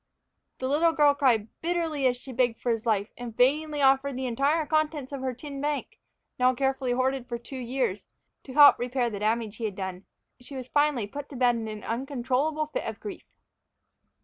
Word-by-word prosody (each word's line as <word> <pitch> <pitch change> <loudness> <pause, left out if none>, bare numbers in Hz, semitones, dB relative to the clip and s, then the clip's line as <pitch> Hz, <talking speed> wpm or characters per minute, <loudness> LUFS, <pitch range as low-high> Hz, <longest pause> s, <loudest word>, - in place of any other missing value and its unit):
The 260 - -3
little 320 +4 +3
girl 295 -2 +5
cried 250 -7 +2
bitterly 325 -5 0
as 250 -1 +1
she 260 +1 -10
begged 245 -2 +1
for 245 - 0
his 225 0 -2
life, 210 -1 +1
and 235 -2 -7
vainly 295 +3 +2
offered 270 0 +3
the 260 - -3
entire 280 +6 +1
contents 305 -2 0
of 275 -2 -5
her 260 -2 -2
tin 280 +2 -7
bank, 295 0 -3 0.4
now 255 0 +4
carefully 265 -1 0
hoarded 260 0 -1
for 240 - -2
two 255 +3 -8
years, 245 -5 -2 0.4
to 260 - -9
help 290 0 +8
repair 245 0 -1
the 205 - -5
damage 215 0 -1
he 230 - -3
had 205 -3 -3
done. 190 -1 -5 0.3
She 250 +3 -11
was 255 -2 -6
finally 290 -5 +2
put 285 +7 -8
to 280 - -9
bed 245 -1 +3
in 225 -1 -4
an 215 -1 -7
uncontrollable 270 +5 -1
fit 405 +12 -4
of - - -5
grief. 410 -2 -8
260 Hz, 200 wpm, -27 LUFS, 235-290 Hz, 0.4 s, help